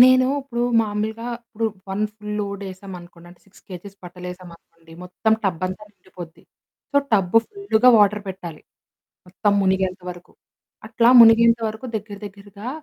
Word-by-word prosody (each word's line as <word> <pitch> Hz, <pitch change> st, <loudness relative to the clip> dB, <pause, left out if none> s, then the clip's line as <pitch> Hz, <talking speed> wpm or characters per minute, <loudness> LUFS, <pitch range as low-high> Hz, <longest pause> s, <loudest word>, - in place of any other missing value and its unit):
నేను 255 Hz, 0 st, +7 dB
ఇప్పుడు 240 Hz, -3 st, -4 dB, 0.2 s
మామూలుగా 220 Hz, +2 st, -3 dB, 0.2 s
ఇప్పుడు 225 Hz, 0 st, -5 dB, 0.2 s
1 195 Hz, +2 st, -1 dB
ఫుల్ 210 Hz, -1 st, -10 dB
లోడ్ 200 Hz, 0 st, -5 dB
ఏసామనుకోండి. 180 Hz, -2 st, -12 dB
అంటే 175 Hz, -, -19 dB
6 195 Hz, -, -21 dB
కేజెస్ 195 Hz, +2 st, -10 dB
బట్టలేసామనుకోండి. 175 Hz, -2 st, -12 dB
మొత్తం 185 Hz, +5 st, -1 dB
టబ్బంతా 185 Hz, +2 st, -2 dB
నిండిపోద్ది. 180 Hz, -4 st, -13 dB, 0.5 s
సో, -, -, +1 dB, 0.2 s
టబ్బు 195 Hz, -1 st, +2 dB
ఫుల్లుగా 400 Hz, -, +2 dB
వాటర్ 210 Hz, 0 st, +3 dB
పెట్టాలి, 175 Hz, -4 st, -8 dB, 0.7 s
మొత్తం 205 Hz, +3 st, 0 dB
మునిగేంత 190 Hz, 0 st, 0 dB
వరకు. 175 Hz, 0 st, -13 dB, 0.6 s
అట్లా 230 Hz, +1 st, +3 dB
మునిగేంత 230 Hz, 0 st, +6 dB
వరకు 220 Hz, +4 st, -8 dB
దగ్గర 205 Hz, -1 st, -7 dB
దగ్గరగా 200 Hz, +3 st, -11 dB
200 Hz, 130 wpm, -21 LUFS, 180-220 Hz, 0.7 s, నేను